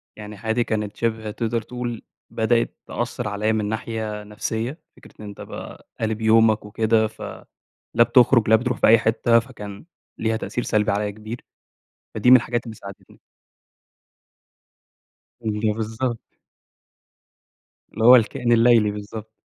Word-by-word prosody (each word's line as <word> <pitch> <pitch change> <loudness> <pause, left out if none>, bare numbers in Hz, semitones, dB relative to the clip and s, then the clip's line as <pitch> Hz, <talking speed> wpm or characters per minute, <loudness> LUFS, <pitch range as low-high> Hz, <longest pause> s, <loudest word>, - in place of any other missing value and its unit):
يعني 105 -1 -9
حياتي 110 +3 0
كانت 105 -2 -3
شِبه 110 -2 -2
تقدر 115 +1 -2
تقول 120 0 -5 0.3
بدأِت 115 +1 0
تأثّر 120 -1 -4
عليَّ 105 +2 0
من 110 -1 -1
ناحية 110 -1 -4
نفسية، 110 +7 -4 0.2
فكرة - - -16
إن 105 - -9
أنت 100 - -9
بقى - - -9
قالب 110 0 -2
يومك 110 -1 +4
وكده 110 +1 +1
ف 105 - -16 0.7
لا 120 - +6
بتخرج 120 -2 +4
لا 110 - +7
بتروح 125 +2 -2
في - - +3
أي 115 - +7
حتة، 115 +1 +3
فكان 105 -4 -8 0.3
ليها 110 0 0
تأثير 120 +2 -4
سلبي 105 -1 +1
عليَّ 105 0 -1
كبير، 110 +3 -9 0.7
فدي 125 - +3
من 130 - +11
الحاجات 120 0 -2
اللي 115 -2 -8
ساعدتني. 100 -1 -13 2.3
أيوه، 105 0 0
بالضبط. 115 +2 -3 1.7
اللي 110 - -3
هو 125 - +10
الكائن 120 +1 +1
الليلي، 115 -2 +5
بالضبط. 105 +1 -8
110 Hz, 140 wpm, -22 LUFS, 105-120 Hz, 2.3 s, من